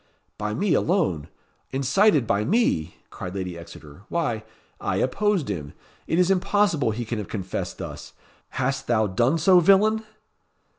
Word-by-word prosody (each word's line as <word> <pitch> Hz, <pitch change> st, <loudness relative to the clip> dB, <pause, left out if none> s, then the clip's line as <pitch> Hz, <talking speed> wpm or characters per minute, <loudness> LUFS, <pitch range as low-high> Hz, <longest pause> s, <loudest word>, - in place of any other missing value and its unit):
"By 105 Hz, 0 st, -2 dB
me 190 Hz, -, +1 dB
alone! 125 Hz, -, +1 dB, 0.4 s
incited 140 Hz, -, +3 dB
by 100 Hz, -1 st, +1 dB
me!" 110 Hz, -, +1 dB, 0.2 s
cried 90 Hz, +1 st, -7 dB
Lady 90 Hz, -2 st, -4 dB
Exeter; 80 Hz, -2 st, -12 dB
"why, 145 Hz, -11 st, -1 dB, 0.4 s
I -, -, -2 dB
opposed 200 Hz, +5 st, +1 dB
him. 80 Hz, -8 st, -5 dB, 0.3 s
It 160 Hz, -, 0 dB
is 180 Hz, +1 st, +4 dB
impossible 190 Hz, -, +2 dB
he 115 Hz, +2 st, -3 dB
can 110 Hz, 0 st, -3 dB
have 105 Hz, -, -5 dB
confessed 95 Hz, -4 st, -4 dB
thus. -, -, -8 dB, 0.4 s
Hast 135 Hz, +1 st, -1 dB
thou 110 Hz, -2 st, +2 dB
done 120 Hz, -, +1 dB
so, 180 Hz, +3 st, +6 dB
villain?" 210 Hz, +5 st, +4 dB
130 Hz, 145 wpm, -24 LUFS, -, 0.4 s, so